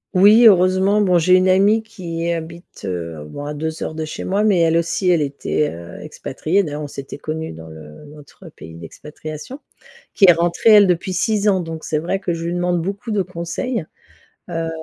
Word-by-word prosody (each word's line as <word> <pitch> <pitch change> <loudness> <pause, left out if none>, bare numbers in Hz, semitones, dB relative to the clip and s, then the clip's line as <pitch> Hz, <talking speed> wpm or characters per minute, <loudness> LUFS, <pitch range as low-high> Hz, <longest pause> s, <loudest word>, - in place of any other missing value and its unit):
Oui, 210 +5 +7
heureusement, 190 +1 +4
bon, 180 -3 +3
j'ai 180 +3 +4
une 185 0 +3
amie 200 +4 +3
qui 170 -6 -5
habite, 170 +1 -8
heu, 85 -5 -5
bon 145 - -8
à 150 - -4
2 160 +2 -4
heures - - -4
de 160 0 -4
chez 155 - -7
moi, 200 +3 0
mais, 205 -4 +3
elle 165 0 +3
aussi, 170 +3 -1
elle 165 -3 +2
était, 145 +1 -1
heu, 85 +1 -10
expatriée. 190 +6 -2
D'ailleurs, 150 -2 -5
on 145 - -5
s'était 140 0 -9
connues 160 +2 -5
dans 80 0 -11
le 80 - -13
notre 150 +4 -14
pays 80 - -13
d'expatriation. 150 - -9 0.5
Qui 200 - +5
est 175 - +9
rentrée 170 +6 +1
elle 210 -1 +8
depuis 185 +1 -1
6 210 +3 0
ans, 190 -2 +2
donc 165 -2 -6
c'est 155 - -2
vrai 170 +5 -2
que 175 -3 -2
je 165 0 -5
lui 170 - -2
demande 175 0 0
beaucoup 200 +5 -5
de 205 -3 0
conseils, 185 +5 -4 0.7
heu, 165 -1 -3
170 Hz, 200 wpm, -19 LUFS, 150-190 Hz, 0.7 s, est